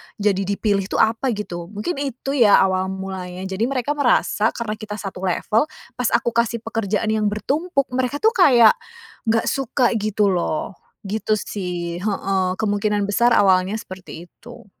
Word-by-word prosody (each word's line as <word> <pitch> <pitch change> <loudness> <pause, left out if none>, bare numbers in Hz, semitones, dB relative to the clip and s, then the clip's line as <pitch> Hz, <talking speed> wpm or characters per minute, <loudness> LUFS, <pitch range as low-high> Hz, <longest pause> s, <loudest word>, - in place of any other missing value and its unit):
jadi 200 -2 +1
dipilih 200 -1 0
tuh - - +1
apa 225 +2 0
gitu?" 175 -5 -6
Mungkin 215 - -4
itu 270 -1 -4
ya 235 -7 +5
awal 185 0 0
mulanya. 190 -1 -6
Jadi 190 +4 -1
mereka 265 0 -1
merasa 245 -6 +2
karena 215 -2 -4
kita 210 -1 -6
satu 195 -3 -7
level, 215 - +1 0.3
pas 250 - +1
aku 235 0 +1
kasih 235 0 0
pekerjaan 220 -1 -1
yang 215 -1 +1
bertumpuk 275 - -1
mereka 260 +3 -2
tuh 445 - +5
kayak, 255 - +6 0.6
nggak 225 0 +2
suka 260 -2 +1
gitu 210 -1 +1
loh. 175 +1 -2 0.3
Gitu 215 +2 0
sih, 175 -4 -4
heeh, 195 -2 0
kemungkinan 205 -1 0
besar 235 +4 +3
awalnya 190 0 +3
seperti 185 -5 -10
itu. - - -14
210 Hz, 155 wpm, -21 LUFS, 190-235 Hz, 0.6 s, kayak